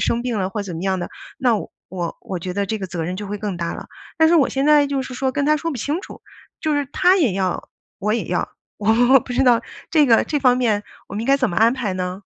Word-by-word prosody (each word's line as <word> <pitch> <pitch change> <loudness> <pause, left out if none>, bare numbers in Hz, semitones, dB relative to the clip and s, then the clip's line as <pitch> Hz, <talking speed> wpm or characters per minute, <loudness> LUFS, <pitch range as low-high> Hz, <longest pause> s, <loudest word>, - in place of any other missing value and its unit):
生 235 0 0
病 245 -3 -2
了 185 -1 0
或 210 0 -3
怎 185 -4 -6
么 165 - -5
样 190 -1 0
的， 175 - -4 0.3
那 245 -5 +3
我 175 -3 -6
我 190 - -5
觉 180 +1 -5
得 200 +1 0
这 220 +2 -2
个 190 - -4
责 170 -2 -4
任 180 +3 -3
就 205 +1 -6
会 205 +1 -4
更 200 -3 -3
大 170 -1 -3
了。 - - -8 0.3
但 320 -1 +5
是 340 - +4
我 285 - +4
现 270 +1 -1
在 300 -1 +5
就 275 -1 -1
是 255 - -8
说， 260 +1 -1
跟 285 +1 0
他 305 +1 +3
说 330 +2 -3
不 285 - -4
清 290 - -2
楚， - - -12 0.4
就 310 - 0
是 290 -1 0
他 365 +2 +4
也 290 - +2
要， 185 -2 -2 0.3
我 210 +2 0
也 235 - -1
要， - - -1 0.3
我 240 +5 +5
不 250 - -7
知 255 - +2
道 240 -2 +5 0.3
这 305 -3 +4
个 230 -2 +5
这 295 - -1
方 250 -2 +4
面 220 -5 +1 0.3
我 - - -8
们 210 - -2
应 - - -5
该 275 - +5
怎 255 -6 0
么 175 - -5
安 225 +2 +5
排 235 -7 -2
呢？ 185 +1 -4
230 Hz, 300 characters per minute, -21 LUFS, 195-275 Hz, 0.4 s, 但